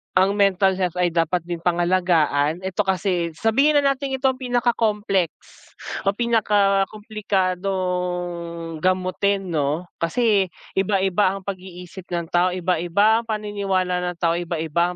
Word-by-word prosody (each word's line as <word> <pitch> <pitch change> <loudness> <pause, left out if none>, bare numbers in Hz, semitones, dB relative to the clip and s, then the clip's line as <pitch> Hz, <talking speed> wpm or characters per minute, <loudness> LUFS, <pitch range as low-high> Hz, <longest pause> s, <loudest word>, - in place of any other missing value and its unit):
ang 190 +2 +4
mental 195 -1 +2
health 180 -2 -1
ay 180 -1 +1
dapat 165 +1 0
din 170 0 -5
pangalagaan 170 -3 +1
ito 190 +1 -2
kasi 180 -3 0
sabihin 270 - +2
na 290 - +4
nating 275 0 -3
ito 265 0 +2
ang 255 - -11
pinaka-complex 225 -6 +1 0.8
o 195 - +2
pinakakomplikadong 190 -6 -1
gamutin 185 +1 0
'no, 150 +2 0 0.2
kasi 200 +3 +2 0.2
iba-iba 195 0 +1
ang 195 - -8
pag-iisip 185 -1 -8
ng 170 -2 -4
tao, 175 +1 +3
iba-iba 185 +5 +2
ang 230 - -9
paniniwala 200 -4 -1
ng - - -11
tao, 170 0 0
iba-iba 170 +1 -1
185 Hz, 125 wpm, -22 LUFS, 175-205 Hz, 0.8 s, ang